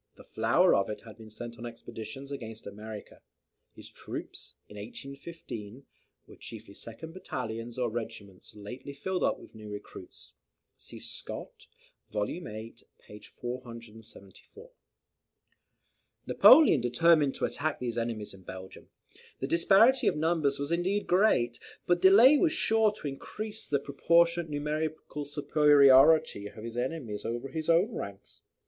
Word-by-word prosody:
The - - -15
flower - - +3
of 100 - +2
it 105 - -5
had 115 0 -14
been 110 -1 -11
sent 115 +2 -8
on - - -8
the 120 - -4
expeditions 115 +3 -9
against 115 -5 -7
America. 105 +1 -9 0.5
His - - -11
troops, - - -8
in 105 - -14
1815, 130 +1 -9 0.4
were - - -15
chiefly 110 -3 -10
second 115 +11 -9
battalions, 115 -9 -6
or 125 -1 0
regiments 105 -4 -7
lately 125 +7 -9
filled 180 +6 -3
up - - +1
with - - -15
new 110 -1 -10
recruits. 105 0 -10 0.4
See - - -11
Scott, - - -5 0.4
vol 105 -1 -1
viii. 110 -7 -7 0.3
p. 105 - -11
474.] 115 - -10 1.5
Napoleon 275 - +7
determined 145 +4 +3
to - - 0
attack 155 +1 -2
these 120 -2 -2
enemies 115 -3 -4
in 95 - -14
Belgium. 95 +1 -10 0.5
The - - -2
disparity 210 - +4
of - - +2
numbers 155 -3 +1
was 140 +2 -4
indeed 185 +4 0
great, 175 - +2 0.3
but 175 0 +2
delay 230 +10 +8
was 335 - +3
sure 220 -6 +3
to 155 - -7
increase 210 +10 -5
the 145 - +1
proportionate 170 +4 +2
numerical 150 0 -3
superiority 145 -4 +5
of 110 +1 -11
his 115 0 -7
enemies 120 -4 -3
over 120 +3 -4
his 155 +3 -4
own 180 +8 +3
ranks. 100 - -8
135 Hz, 140 wpm, -29 LUFS, 110-165 Hz, 1.5 s, delay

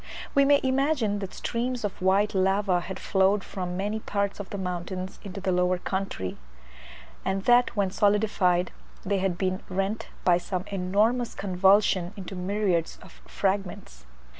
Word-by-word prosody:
We 280 -1 +5
may 285 0 +5
imagine 260 -5 +1
that 195 -2 -5
streams 245 +1 -2
of 205 -3 -4
white 195 +3 +3
lava 190 -1 +2
had 185 +2 -6
flowed 195 +1 +2
from 180 -2 -5
many 205 +3 -2
parts 200 -1 -2
of 200 - -6
the 200 - -5
mountains 185 0 -4
into 195 -1 -7
the 190 -1 -1
lower 180 0 +2
country, 190 - -4 0.8
and 190 0 -1
that 245 +1 +4
when 200 -3 +1
solidified 200 -3 +2 0.3
they 200 0 +1
had 185 -2 0
been 185 0 -1
rent 195 +3 -2 0.2
by 175 -1 +5
some 185 0 -3
enormous 210 +6 +1
convulsion 190 -1 +3
into 190 0 -7
myriads 185 -2 -1
of - - -16
fragments. 195 - -3
195 Hz, 150 wpm, -27 LUFS, 185-205 Hz, 0.8 s, We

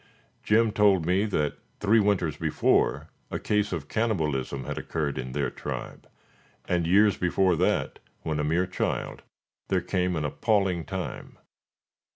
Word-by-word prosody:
Jim 110 +1 +3
told 100 -5 +3
me 95 +4 +2
that 75 -9 -1 0.2
three 105 +2 +4
winters 100 -7 +1
before 80 -2 +1 0.2
a - - -3
case 105 0 0
of 80 -6 -4
cannibalism 75 - -1
had - - -4
occurred 75 -4 -3
in 65 -1 -5
their 70 0 -1
tribe, - - -7 0.6
and 85 -2 0
years 100 +2 +4
before 90 0 +2
that, - - 0 0.2
when 80 -1 -2
a - - 0
mere 85 +5 +1
child, 95 - -3 0.5
there - - +2
came 90 -1 -1
an 75 -2 -1
appalling 95 - +1
time. 95 -2 -6
90 Hz, 145 wpm, -27 LUFS, 75-105 Hz, 0.6 s, three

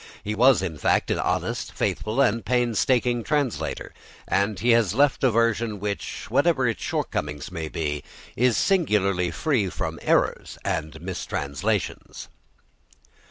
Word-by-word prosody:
He 105 - -2
was, 120 -1 +5
in 80 -5 -4
fact, - - +2
an - - 0
honest, - - -2
faithful, 110 +6 -1
and 115 -4 +2
painstaking 120 +1 +1
translator, 145 -5 -2 0.3
and 100 +1 +1
he 120 +4 +3
has 115 -4 +3
left 140 0 +3
a 130 - +6
version 115 -2 +1
which, 100 0 -4
whatever - - +3
its - - -2
shortcomings 75 +4 -3
may 80 -3 -4
be, 75 -2 -3 0.3
is 125 -1 +3
singularly 100 - +2
free 105 - 0
from - - -4
errors - - +1
and 80 0 -2
mistranslations. 70 -6 -3
105 Hz, 130 wpm, -25 LUFS, 90-120 Hz, 0.3 s, a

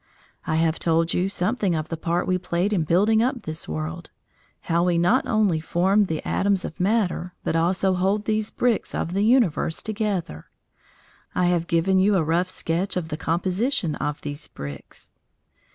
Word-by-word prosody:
I 160 - 0
have 160 0 +1
told 165 0 +1
you 180 +2 +1
something 195 -1 0
of 155 0 -3
the 165 - -2
part 170 +2 -1
we 185 0 0
played 180 +4 -1
in 170 -6 +1
building 210 +7 +3
up 250 -1 -1
this 155 0 -5
world 80 +1 -5 0.5
how 170 +1 +1
we 175 -1 +2
not 180 +10 +2
only 210 -8 +2
form 190 +6 +2
the 160 -4 -4
atoms 195 -1 +1
of - - -8
matter, 180 -3 0
but - - -1
also 185 +3 +2
hold 195 +3 0
these 215 -1 0
bricks 240 -3 0
of 170 - -2
the 200 +2 +1
universe 215 - +2
together. 200 - -3 0.9
I 180 - +2
have 170 -1 0
given 175 +3 +2
you 200 +2 +3
a 175 - +2
rough 170 +4 +1
sketch 185 +2 -2
of 165 -3 -3
the 150 - -3
composition 180 - 0
of 150 0 -3
these 145 +1 -6
bricks. 70 -1 -9
180 Hz, 175 wpm, -24 LUFS, 165-205 Hz, 0.9 s, building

